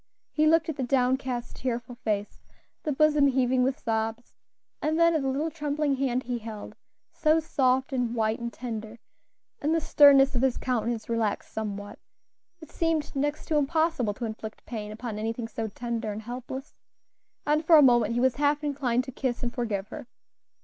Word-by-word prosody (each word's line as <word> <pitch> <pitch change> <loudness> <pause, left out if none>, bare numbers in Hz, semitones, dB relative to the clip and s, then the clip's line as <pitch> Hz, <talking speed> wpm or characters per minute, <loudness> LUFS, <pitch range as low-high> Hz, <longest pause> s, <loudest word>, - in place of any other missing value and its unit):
He 310 0 +2
looked 325 0 +4
at 320 - -4
the - - -2
downcast, 255 -1 0
tearful 245 -1 -3
face, 210 -4 -3 0.4
the 305 - -2
bosom 300 0 +4
heaving 255 -1 +2
with 260 +1 +1
sobs, 225 +1 -2 0.5
and 310 +2 0
then 335 0 +5
at 315 - +1
the 270 - -1
little 290 +5 -1
trembling 295 -2 -1
hand 260 -1 0
he 245 -1 -3
held, 215 -1 -8 0.4
so 310 +1 +3
soft, 265 -4 +1
and 245 -2 -1
white, 220 -1 0
and 235 0 -4
tender, 225 -1 -6 0.6
and 310 +3 +1
the - - +3
sternness 285 -3 +6
of 245 - 0
his 265 -2 +2
countenance 235 -2 -2
relaxed 230 -3 -2
somewhat; 205 -1 -5 0.6
it 315 - -12
seemed 325 -4 -1
next 290 +2 -1
to 310 - +2
impossible 295 -7 +1
to 240 - -4
inflict 220 -1 -7
pain 210 -3 -6
upon 220 -1 -5
anything 225 +1 -3
so 225 0 -4
tender 230 0 -4
and 210 +2 -6
helpless; 255 +4 -7 0.7
and 300 +2 +2
for 320 0 +7
a 295 - +8
moment 240 -2 +4
he - - +1
was 260 0 +2
half 290 +1 +1
inclined 265 -4 0
to 260 - -8
kiss 255 -1 -3
and 240 0 -2
forgive 210 -5 -3
her. - - -8
250 Hz, 180 wpm, -27 LUFS, 230-290 Hz, 0.7 s, a